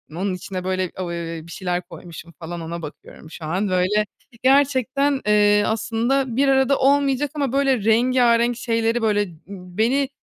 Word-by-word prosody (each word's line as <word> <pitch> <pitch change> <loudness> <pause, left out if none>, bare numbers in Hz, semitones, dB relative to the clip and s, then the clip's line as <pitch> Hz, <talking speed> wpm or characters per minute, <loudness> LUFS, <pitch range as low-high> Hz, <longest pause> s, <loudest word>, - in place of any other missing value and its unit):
Onun 190 +1 -2
içine 185 0 -6
böyle, 185 -1 -2
ııı, 170 -2 -5
bir - - -12
şeyler 180 -1 -2
koymuşum 170 -1 -11
falan 170 +1 -6
ona 170 +1 -6
bakıyorum 155 +1 -11
şu 160 - -8
an. 185 +5 -1
Böyle 185 +4 +1 0.4
gerçekten, 275 0 +2
eee, 205 0 +4
aslında 230 +4 -1
bir 275 +1 +2
arada 270 0 +3
olmayacak 280 0 +2
ama 280 -4 -1
böyle 270 -6 +1
rengarenk 240 0 +3
şeyleri 230 -1 0
böyle, 210 -2 +2
ııı, 175 -6 -6 0.4
beni 265 +5 +2
220 Hz, 150 wpm, -21 LUFS, 180-260 Hz, 0.4 s, eee